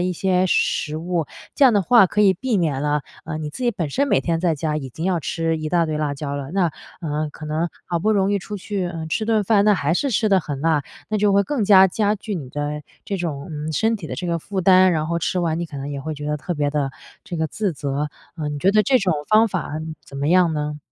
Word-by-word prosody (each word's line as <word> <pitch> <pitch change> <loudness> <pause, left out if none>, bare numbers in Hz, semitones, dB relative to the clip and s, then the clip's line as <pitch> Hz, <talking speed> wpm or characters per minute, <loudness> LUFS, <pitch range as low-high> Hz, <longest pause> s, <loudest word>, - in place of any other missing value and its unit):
一 180 +1 0
些 185 +1 +1
食 155 -3 0
物， 170 -1 -2 0.3
这 285 - +5
样 255 - +7
的 205 - +3
话 230 +2 +6
可 210 - -1
以 200 -2 +6
避 230 +5 -1
免 155 -7 0
了， 150 0 0 0.2
呃， 155 - -4
你 150 -1 -4
自 250 - -5
己 240 - +3
本 165 -7 -3
身 280 - +1
每 - - +3
天 165 -1 -1
在 170 -1 +1
家 150 +1 -2
已 135 -3 -4
经 160 +7 -6
要 185 -2 +1
吃 165 +1 -1
一 155 0 -3
大 170 0 +2
堆 155 -1 -2
辣 150 -2 -1
椒 140 0 -4
了， 140 +1 -6
那 190 -2 +2 0.3
呃， 155 -2 -2
可 155 - -10
能 155 +3 -1 0.2
好 175 -1 -1
不 215 +6 +2
容 195 -1 +2
易 205 - +2
出 205 +2 -6
去， 200 -1 -3
嗯， 165 -2 -5
吃 215 +7 -1
顿 220 -1 +2
饭， 200 0 +3
那 210 -1 +5
还 155 -3 0
是 275 +11 +1
吃 215 +1 +2
得 195 - +5
很 145 -5 -5
辣， 155 -2 +1 0.2
那 215 - 0
就 205 0 +3
会 200 +1 +4
更 235 +2 -1
加 190 -1 +7
加 210 +2 +1
剧 210 0 -5
你 140 -6 -6
的 145 +2 -3 0.2
这 200 - -3
种， 155 -6 -4
嗯， 155 0 -4
身 225 +8 +1
体 190 -6 -8
的 - - -5
这 - - -5
个 170 0 0
负 190 +4 -4
担， 185 0 +6
然 155 -1 -1
后 170 0 0
吃 180 +2 -1
完 165 -2 0
你 170 - -3
可 150 - -9
能 140 +1 -5
也 140 -1 -4
会 155 +3 -4
觉 150 0 -8
得 150 - 0
特 175 +4 -4
别 145 -2 0
的 140 -2 -1 0.3
这 175 - -5
个 160 -1 -1
自 205 0 -2
责。 140 0 -2 0.3
呃， 155 -3 -3
你 150 - -3
觉 190 - +4
得 210 +1 +3
这 265 -2 +4
种 190 -3 +1 0.2
方 220 +1 +5
法， 185 -6 -3
嗯， 155 0 -6
怎 140 - -10
么 140 +1 -1
样 175 -1 +4
呢？ 150 -1 -3
170 Hz, 300 characters per minute, -22 LUFS, 150-195 Hz, 0.3 s, 样